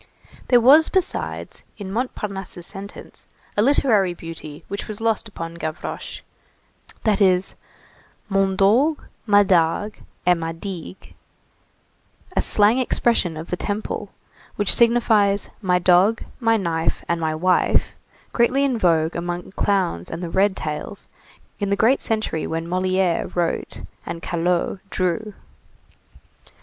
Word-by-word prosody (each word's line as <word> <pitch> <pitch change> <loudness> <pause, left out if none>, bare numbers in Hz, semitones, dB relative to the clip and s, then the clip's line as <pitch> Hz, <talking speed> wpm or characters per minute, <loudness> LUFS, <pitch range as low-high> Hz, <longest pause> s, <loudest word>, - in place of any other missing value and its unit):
There 245 - +5
was 285 +7 +6
besides, 375 -1 -2 0.2
in 195 -2 -7
Montparnasse's 195 -6 -4
sentence, 200 +1 -10 0.3
a 205 - +2
literary 215 -8 +3
beauty 160 -3 -9
which 200 - -5
was 215 -1 -6
lost 225 0 0
upon 165 -6 -7
Gavroche, 155 -1 -5 0.8
that 215 -1 +1
is 185 -1 +4 0.7
mon 195 -1 +1
dogue, 240 +11 +3 0.3
ma 205 -1 +6
dague 185 +3 +1 0.3
et 180 - +6
ma 165 0 -3
digue, 185 +1 -8 1.2
a - - +3
slang 215 +4 +4
expression 230 -9 +1
of 160 +2 -8
the - - +1
Temple, 205 +1 -4 0.5
which 205 -2 +5
signifies 220 -4 +3
my 180 -3 +2
dog, 185 +5 +3 0.2
my 225 -2 +3
knife, 165 -4 -1
and 170 -1 -1
my 160 -1 -1
wife, 180 +3 +1 0.4
greatly 250 +3 +2
in 260 -4 0
vogue 165 -3 +2
among 175 +1 -4
clowns 185 - 0
and 165 +2 -6
the 170 - -5
red 195 0 +2
tails 155 +6 -5 0.5
in 200 -2 -1
the 200 - +2
great 230 +7 +3
century 215 -8 -1
when 165 0 -3
Molière 185 0 0
wrote 170 -2 -2 0.2
and 165 - -7
Callot 175 +2 -1
drew. 190 +3 -2
195 Hz, 130 wpm, -22 LUFS, 175-215 Hz, 1.2 s, was